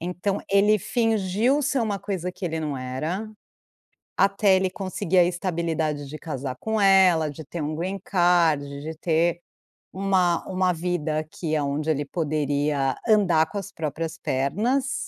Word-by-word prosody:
Então 180 Hz, +3 st, -2 dB
ele 200 Hz, +2 st, +5 dB
fingiu 225 Hz, +5 st, +1 dB
ser 280 Hz, -1 st, 0 dB
uma 210 Hz, -3 st, -1 dB
coisa 180 Hz, -3 st, -3 dB
que 190 Hz, -, -8 dB
ele 160 Hz, -2 st, -2 dB
não 150 Hz, -3 st, -3 dB
era, 155 Hz, +12 st, -4 dB, 0.9 s
até 200 Hz, 0 st, +4 dB
ele 185 Hz, 0 st, +1 dB
conseguir 185 Hz, -2 st, 0 dB
a -, -, +7 dB
estabilidade 165 Hz, -4 st, -2 dB
de 155 Hz, -, -7 dB
casar 135 Hz, -5 st, -5 dB
com 220 Hz, -1 st, -1 dB
ela, 185 Hz, -5 st, +5 dB
de 150 Hz, +2 st, -8 dB
ter 165 Hz, +3 st, -6 dB
um 155 Hz, +1 st, -2 dB
green 190 Hz, +4 st, -3 dB
card, 175 Hz, -5 st, +3 dB, 0.2 s
de 160 Hz, +2 st, -6 dB
ter 170 Hz, +1 st, +1 dB, 0.5 s
uma 185 Hz, -3 st, +1 dB
uma 185 Hz, -1 st, +1 dB
vida 165 Hz, -2 st, -2 dB
aqui 155 Hz, +1 st, -3 dB
aonde 145 Hz, +1 st, -1 dB
ele 145 Hz, -1 st, 0 dB
poderia 145 Hz, -3 st, 0 dB
andar 185 Hz, -7 st, +4 dB
com 205 Hz, -, -4 dB
as 200 Hz, 0 st, -7 dB
próprias 160 Hz, +1 st, -4 dB
pernas 220 Hz, -, 0 dB
175 Hz, 150 wpm, -24 LUFS, 155-195 Hz, 0.9 s, a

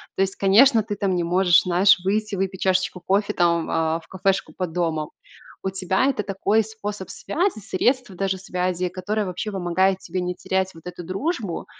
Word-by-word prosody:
То -, -, 0 dB
есть, 195 Hz, 0 st, 0 dB
конечно, 220 Hz, +4 st, +5 dB
ты 205 Hz, -1 st, -4 dB
там 195 Hz, -2 st, 0 dB
не 175 Hz, -, 0 dB
можешь, 180 Hz, +1 st, +4 dB
знаешь, 185 Hz, +2 st, +5 dB
выйти, 210 Hz, +1 st, 0 dB
выпить 190 Hz, 0 st, -3 dB
чашечку 185 Hz, -1 st, +1 dB
кофе 200 Hz, +2 st, +1 dB
там, 170 Hz, -1 st, +2 dB
а, 160 Hz, 0 st, 0 dB
в 165 Hz, -, -21 dB
кафешку 190 Hz, +1 st, -1 dB
под 180 Hz, -3 st, -3 dB
домом. 160 Hz, -3 st, -1 dB, 0.5 s
У 190 Hz, -, -1 dB
тебя 190 Hz, +5 st, 0 dB
это 265 Hz, -6 st, 0 dB
такой 200 Hz, +2 st, +1 dB
способ 210 Hz, -3 st, -6 dB
связи, 350 Hz, -, -1 dB
средств 245 Hz, +5 st, 0 dB
даже 190 Hz, +1 st, -2 dB
связи, 180 Hz, -1 st, -2 dB
которое 205 Hz, +3 st, -2 dB
вообще 185 Hz, +4 st, -4 dB
помогает 190 Hz, 0 st, +1 dB
тебе 185 Hz, +1 st, -4 dB
не 180 Hz, 0 st, -2 dB
терять 190 Hz, 0 st, -2 dB
вот 165 Hz, +1 st, -15 dB
эту 180 Hz, 0 st, -7 dB
дружбу. 200 Hz, -, -3 dB
190 Hz, 185 wpm, -23 LUFS, 180-205 Hz, 0.5 s, конечно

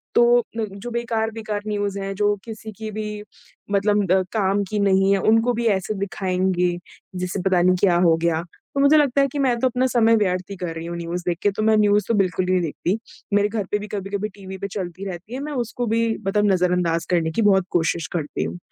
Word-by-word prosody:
तो 240 Hz, 0 st, +6 dB
अ, 240 Hz, -, -2 dB, 0.3 s
जो 200 Hz, +5 st, -7 dB
बेकार-बेकार 225 Hz, -2 st, -2 dB
न्यूज़ 205 Hz, -1 st, -2 dB
हैं 195 Hz, 0 st, -3 dB
जो 205 Hz, +1 st, +2 dB
किसी 220 Hz, -1 st, -8 dB
की 220 Hz, -1 st, -6 dB
भी 210 Hz, 0 st, -5 dB, 0.5 s
मतलब 200 Hz, -2 st, +2 dB
अ, 190 Hz, -, +5 dB
काम 200 Hz, -2 st, +1 dB
की 210 Hz, -, -1 dB
नहीं 195 Hz, -1 st, +3 dB
है 195 Hz, -, +3 dB
उनको 225 Hz, +5 st, +3 dB
भी 235 Hz, 0 st, -2 dB
ऐसे 195 Hz, +3 st, -4 dB
दिखाएँगे 185 Hz, -2 st, 0 dB, 0.4 s
जिससे 180 Hz, +1 st, -3 dB
पता 185 Hz, -2 st, +3 dB
नहीं 185 Hz, +1 st, +4 dB
क्या 180 Hz, -3 st, +4 dB
हो 165 Hz, -, +5 dB
गया। 170 Hz, -1 st, +1 dB, 0.3 s
तो 280 Hz, -, -1 dB
मुझे 280 Hz, +2 st, +6 dB
लगता 280 Hz, -2 st, +3 dB
है 275 Hz, -, +3 dB
कि 290 Hz, -, -3 dB
मैं 255 Hz, -3 st, +2 dB
तो 260 Hz, -, +3 dB
अपना 255 Hz, +1 st, 0 dB
समय 230 Hz, -1 st, +5 dB
व्यर्थ 185 Hz, -2 st, 0 dB
ही 200 Hz, -, -5 dB
कर 175 Hz, -2 st, -4 dB
रही 165 Hz, 0 st, -6 dB
हूँ 170 Hz, 0 st, -5 dB
न्यूज़ 170 Hz, +1 st, -4 dB
देख 175 Hz, -2 st, 0 dB
के 205 Hz, -, +4 dB
तो 200 Hz, -, -4 dB
मैं 220 Hz, 0 st, +4 dB
न्यूज़ 205 Hz, -1 st, +3 dB
तो 230 Hz, -, +1 dB
बिल्कुल 185 Hz, -3 st, +1 dB
ही 185 Hz, -, -1 dB
नहीं 185 Hz, -1 st, +3 dB
देखती। 175 Hz, +4 st, -2 dB, 0.4 s
मेरे 205 Hz, 0 st, +4 dB
घर 215 Hz, -1 st, -2 dB
पे 210 Hz, -, +2 dB
भी 210 Hz, -, -7 dB
कभी-कभी 200 Hz, +1 st, -3 dB
टीवी 190 Hz, -1 st, -8 dB
पे 200 Hz, -, -4 dB
चलती 190 Hz, -1 st, -6 dB
रहती 185 Hz, +4 st, -7 dB
है 260 Hz, -, -3 dB
मैं 300 Hz, -, -5 dB
उसको 240 Hz, +2 st, -4 dB
भी 225 Hz, +1 st, +1 dB, 0.3 s
मतलब 210 Hz, +1 st, +2 dB
नज़रअंदाज़ 180 Hz, -2 st, +1 dB
करने 165 Hz, -2 st, +1 dB
की 195 Hz, -, 0 dB
बहुत 195 Hz, -3 st, +4 dB
कोशिश 165 Hz, 0 st, 0 dB
करती 150 Hz, -, -2 dB
हूँ। 85 Hz, +2 st, -4 dB
200 Hz, 230 wpm, -22 LUFS, 180-220 Hz, 0.5 s, तो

